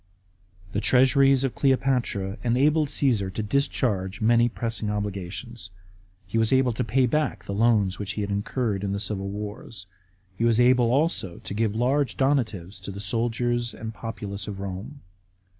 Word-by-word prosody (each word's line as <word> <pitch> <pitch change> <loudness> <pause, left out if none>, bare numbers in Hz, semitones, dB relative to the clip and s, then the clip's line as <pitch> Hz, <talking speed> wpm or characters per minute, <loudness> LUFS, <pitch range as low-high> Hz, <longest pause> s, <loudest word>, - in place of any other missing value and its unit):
f 95 - -21
The 100 - 0
treasures 135 +3 +4
of 135 - -1
Cleopatra 125 -8 0
enabled 145 +6 +3
Cassar 120 -9 +1
to 105 +3 -4
discharge 105 -5 0
many 120 +2 +4
pressing 115 -2 -3
obligations. 105 +1 -5 0.6
He 105 +5 -1
was 110 -1 +1
able 130 -2 +3
to - - -1
pay 125 +4 +2
back 125 -8 -1
the 100 - -4
loans 105 -3 +2
which 100 -1 -3
he 105 - -3
had 100 0 -3
incurred 100 0 -1
in 100 -1 -1
the 100 - -2
civil 100 -2 -3
wars. 105 -1 -7 0.5
He 115 - -2
was 115 -1 +3
able 125 -1 +4
also 135 - 0
to - - -7
give 110 0 0
large 130 +4 +1
donatives 110 -9 0
to 95 - -6
the 100 0 -6
soldiers 120 +3 -1
and 110 - -6
the 110 - -9
populace 105 -4 -6
of 100 -2 -6
Rome. 100 +9 -6
115 Hz, 170 wpm, -25 LUFS, 100-125 Hz, 0.6 s, treasures